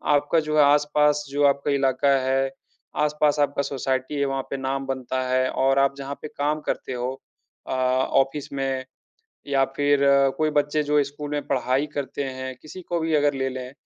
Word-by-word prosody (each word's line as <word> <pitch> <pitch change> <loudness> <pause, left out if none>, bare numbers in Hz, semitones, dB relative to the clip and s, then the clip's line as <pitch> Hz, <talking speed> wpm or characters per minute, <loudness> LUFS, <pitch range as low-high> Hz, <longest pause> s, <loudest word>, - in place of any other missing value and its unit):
आपका 145 +3 +2
जो 155 0 -1
है 150 - +7
आसपास 150 +1 +3
जो 145 +1 0
आपका 140 +1 +2
इलाका 135 0 +2
है, 135 +1 0 0.5
आसपास 150 0 +1
आपका 145 -1 +1
सोसाइटी 130 0 -2
है, 140 - +2
वहाँ 135 0 -1
पे 140 - -3
नाम 135 0 -2
बनता 130 -1 -3
है 130 0 +1
और 135 +1 +2
आप 140 0 +2
जहाँ 140 0 -5
पे - - -5
काम 150 +1 -1
करते - - -3
हो 125 +1 -2 0.6
अ, - - -3
ऑफिस 135 +3 +1
में, 135 -1 -2 0.6
या 140 -1 +2
फिर 145 0 +3 0.4
कोई 155 0 +1
बच्चे 145 +1 -1
जो 150 0 +2
स्कूल 145 +1 -7
में 145 0 -3
पढ़ाई 135 +1 0
करते 140 0 -3
हैं, 130 0 -5
किसी 180 +4 -10
को 170 0 -2
भी 160 0 0
अगर 145 -1 +3
ले 135 0 -1
लें, 130 0 -6
140 Hz, 185 wpm, -24 LUFS, 130-145 Hz, 0.6 s, है